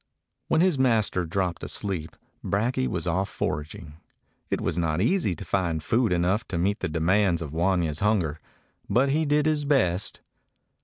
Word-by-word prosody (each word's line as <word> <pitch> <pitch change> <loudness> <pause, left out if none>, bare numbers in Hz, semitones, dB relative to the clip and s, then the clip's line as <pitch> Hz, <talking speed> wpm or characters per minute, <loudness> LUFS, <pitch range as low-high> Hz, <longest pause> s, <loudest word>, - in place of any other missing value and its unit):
When 160 - +3
his 180 -6 +2
master 110 -8 +2
dropped 90 0 -2
asleep 90 -6 -3 0.3
Brakje 125 +6 0
was 85 -1 -3
off 90 +3 0
foraging. 75 +1 -4 0.5
It - - 0
was - - -2
not 80 -2 0
easy 115 - +1
to - - -9
find 85 -5 -1
food 115 +4 +1
enough 90 +5 +1
to 90 - -3
meet 100 +5 0
the - - -2
demands 85 +3 +2
of 80 -3 -6
Wanya's 85 -3 +1
hunger, 90 -8 +1 0.5
but 125 +7 +3
he 155 +3 +1
did 150 +1 +2
his 155 -1 +1
best. 110 -11 +1
95 Hz, 160 wpm, -26 LUFS, 85-120 Hz, 0.5 s, When